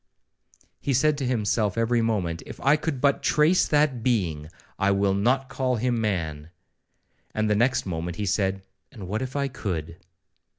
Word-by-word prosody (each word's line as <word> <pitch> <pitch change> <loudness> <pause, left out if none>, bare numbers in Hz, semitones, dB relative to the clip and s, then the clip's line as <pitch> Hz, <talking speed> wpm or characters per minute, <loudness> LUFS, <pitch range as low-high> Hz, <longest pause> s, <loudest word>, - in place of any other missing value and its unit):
He 140 - 0
said 150 +4 +3
to 135 - -1
himself 110 -4 0
every 115 +1 +2
moment, 95 -7 -1
'If - - -9
I 140 +2 +5
could 150 -4 -3
but 140 -1 +2
trace 155 +5 +3
that 145 -5 +2
being, 85 -11 0 0.3
I 100 0 +2
will 100 0 +2
not 125 +7 +1
call 130 -1 -1
him 120 0 0
man,'—and 90 +3 -5
the 105 - +2
next 125 +4 +2
moment 85 -1 -4
he 105 - -2
said, 95 -1 0 0.3
'and 105 -8 -9
what 105 +5 -2
if 130 +1 -5
I 140 -1 0
could?' 85 - -4
110 Hz, 165 wpm, -25 LUFS, 95-130 Hz, 0.3 s, I